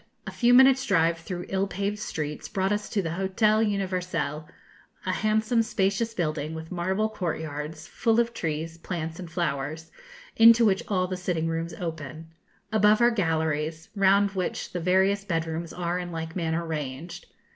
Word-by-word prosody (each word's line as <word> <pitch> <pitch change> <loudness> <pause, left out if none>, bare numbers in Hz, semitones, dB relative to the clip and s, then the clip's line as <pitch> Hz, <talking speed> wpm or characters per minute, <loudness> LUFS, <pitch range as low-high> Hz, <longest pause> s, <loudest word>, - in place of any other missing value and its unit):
A - - -5
few 240 0 +3
minutes' 265 +1 +6
drive 165 0 +3
through 175 +1 -6
ill 195 +1 0
paved 200 +2 -3
streets 150 -7 -4
brought 190 0 0
us 210 0 -1
to 200 - 0
the 165 - -2
Hotel 195 +4 +2
Universel, 180 -7 -1 0.6
a 185 - +1
handsome, 220 +4 +2
spacious 220 +1 0
building, 155 -3 -2
with 160 0 -8
marble 190 +4 0
courtyards, 160 -6 -4
full 230 -1 +1
of 235 0 +1
trees, 160 -2 -3
plants, 165 -1 -5
and 180 -2 -7
flowers, 160 -1 -3 0.4
into 230 +1 +7
which 195 -2 +3
all 185 -3 +1
the 185 0 -4
sitting 175 -3 -1
rooms 165 0 -3
open. 160 -1 -6 0.4
Above 210 0 +4
are 240 0 +5
galleries, 160 -5 -1
round 200 0 +4
which 185 -2 -3
the 180 - -3
various 190 +3 +2
bed 165 -4 -1
rooms 165 +1 -4
are 175 0 -2
in 175 -1 -5
like 160 0 -5
manner 165 -1 -1
ranged. 160 +3 -5
180 Hz, 165 wpm, -26 LUFS, 160-200 Hz, 0.6 s, into